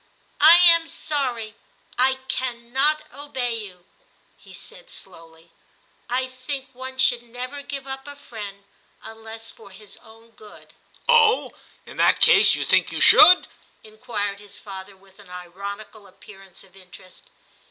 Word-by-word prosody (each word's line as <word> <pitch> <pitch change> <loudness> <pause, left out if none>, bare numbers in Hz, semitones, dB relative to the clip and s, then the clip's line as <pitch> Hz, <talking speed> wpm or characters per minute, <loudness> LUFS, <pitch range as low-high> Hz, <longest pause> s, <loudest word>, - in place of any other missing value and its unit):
* - - -39
I 315 +3 +10
am 335 -2 +5
sorry 250 -10 -4 0.4
I 260 +1 +2
cannot 260 +5 -1
obey 265 -4 -4
you/ 190 -6 -8 0.5
he - - -19
said - - -11
slowly; 165 - -9 0.3
' - - -39
I 260 - -2
think 260 +1 -6
one 260 +1 -9
should 245 -2 +3
never 250 +4 -8
give 275 -1 -7
up 270 +1 -8
a 285 - -10
friend 205 -7 -10 0.4
unless 225 0 -10
for 210 - -17
his 195 +1 -13
own 225 0 -20
good/ 215 -2 -17 0.2
' - - -37
Oh! 465 -1 +3 0.3
in - - -13
that - - +3
case 435 -3 +5
you - - -4
think - - +2
you - - -4
should? 360 +4 +7 0.2
' - - -37
inquired 210 -3 -5
his 205 -1 -11
father, 195 -1 -11
with 195 +1 -24
an 200 -3 -17
ironical 200 +4 -10
appearance 195 -1 -14
of 190 -1 -23
interest. 185 -1 -17
230 Hz, 150 wpm, -22 LUFS, 200-275 Hz, 0.5 s, I